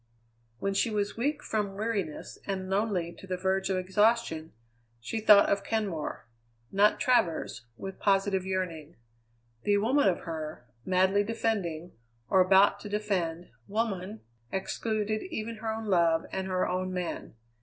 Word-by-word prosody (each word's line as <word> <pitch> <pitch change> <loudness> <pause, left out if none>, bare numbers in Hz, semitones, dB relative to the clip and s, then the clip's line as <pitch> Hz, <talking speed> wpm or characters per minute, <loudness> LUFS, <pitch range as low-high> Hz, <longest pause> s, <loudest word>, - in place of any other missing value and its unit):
When 195 +10 -1
she 215 +4 +2
was 205 -1 -1
weak 290 +6 -1
from 205 -3 -2
weariness 200 -7 -3
and 190 -1 -3
lonely 190 -4 0
to 190 - -11
the 185 -1 -2
verge 190 +1 0
of 190 - +1
exhaustion, 190 -3 +1 0.5
she 115 - -3
thought 210 -2 +7
of 200 0 +1
Kenmore 200 -9 -2 0.5
not 205 +2 +4
Travers 165 - +1
with 195 0 -7
positive 195 -1 +2
yearning. 180 -4 -3 0.7
The 205 0 +3
woman 250 +7 +3
of 180 - -1
her, 155 -5 -6 0.2
madly 190 +2 +3
defending, 200 -7 -2 0.4
or 190 - +6
about 195 +2 +5
to 210 - -8
defend, 185 -5 -2 0.2
woman, 210 -1 -2 0.3
excluded 215 +2 -1
even 230 -8 -4
her 220 0 -3
own 220 0 -4
love 170 -4 +3
and 190 0 -3
her 185 -1 0
own 185 +1 -1
man. 180 -9 -4
195 Hz, 145 wpm, -29 LUFS, 180-215 Hz, 0.7 s, thought